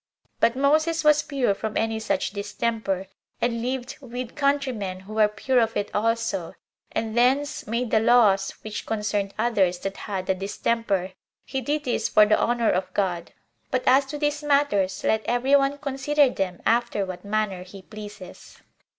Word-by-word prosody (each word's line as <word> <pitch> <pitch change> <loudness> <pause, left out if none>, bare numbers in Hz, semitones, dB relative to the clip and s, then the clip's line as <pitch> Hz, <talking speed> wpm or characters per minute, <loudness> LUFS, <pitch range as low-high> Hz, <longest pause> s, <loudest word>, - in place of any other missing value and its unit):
But 235 - +3
Moses 310 +4 +2
was 300 -1 +5
pure 270 -8 0
from 215 +2 -4
any 225 0 0
such 220 - -1
distemper, 200 -1 -2 0.3
and 235 -1 0
lived 255 +1 -4
with 250 -2 -6
countrymen 260 -10 -1
who 200 +3 -10
were 215 -1 +4
pure 250 +4 0
of 225 -1 +1
it 205 - -2
also, 220 -5 -1 0.4
and 220 0 -2
thence 265 +4 +1
made 235 +2 -2
the 220 - +4
laws 215 -4 +4
which 215 -1 -6
concerned 210 -2 -1
others 205 -6 +2
that 195 0 -4
had 190 -3 -4
the 190 - +2
distemper. 195 0 -1 0.3
He 270 - -3
did 290 +4 -1
this 245 - -1
for 210 - +6
the 210 0 +3
honor 235 -1 +2
of 185 +1 -1
God. 180 -4 -1 0.4
But 255 -1 0
as 270 +2 +5
to 295 +2 -5
these 295 0 -1
matters, 205 -10 +1
let 220 0 +1
every 250 +4 +2
one 275 0 +2
consider 285 0 +2
them 185 -5 -3
after 235 -3 +1
what 185 -1 -7
manner 205 -2 -1
he 185 +1 -11
pleases. 210 -2 -11
225 Hz, 170 wpm, -25 LUFS, 200-265 Hz, 0.4 s, for